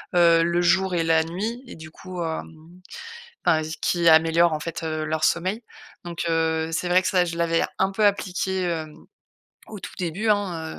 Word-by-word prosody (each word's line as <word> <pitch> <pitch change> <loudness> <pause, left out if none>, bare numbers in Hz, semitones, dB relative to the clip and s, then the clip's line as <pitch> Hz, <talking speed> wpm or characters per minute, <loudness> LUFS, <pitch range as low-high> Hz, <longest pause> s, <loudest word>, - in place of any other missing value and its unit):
heu, 170 -1 +5
le 170 +1 +1
jour 185 +1 +2
et 165 - +1
la 160 -1 +3
nuit 210 +9 -4
et - - -10
du 160 -1 -11
coup, 185 +1 -8
hem, 160 +1 -7 0.7
enfin 155 - +3 0.2
qui 170 -1 +1
améliore 165 +1 +4
en 155 - -2
fait, 165 +2 -6
heu, 155 -1 -2
leur 155 0 -2
sommeil, 185 +6 0 0.4
donc 170 -1 -5
heu, 160 0 0
c'est 170 +2 -2
vrai 180 +1 +4
que - - -1
ça, 180 -2 +2
je 170 -1 -5
l'avais 165 0 +1 0.2
un 190 +1 +2
peu 210 +2 +1
appliqué, 190 -1 0
hem, 160 -3 -3 0.7
au 215 - -9
tout - - -8
début, 180 +5 -2
hein, 180 -6 -1
170 Hz, 190 wpm, -24 LUFS, 160-185 Hz, 0.7 s, heu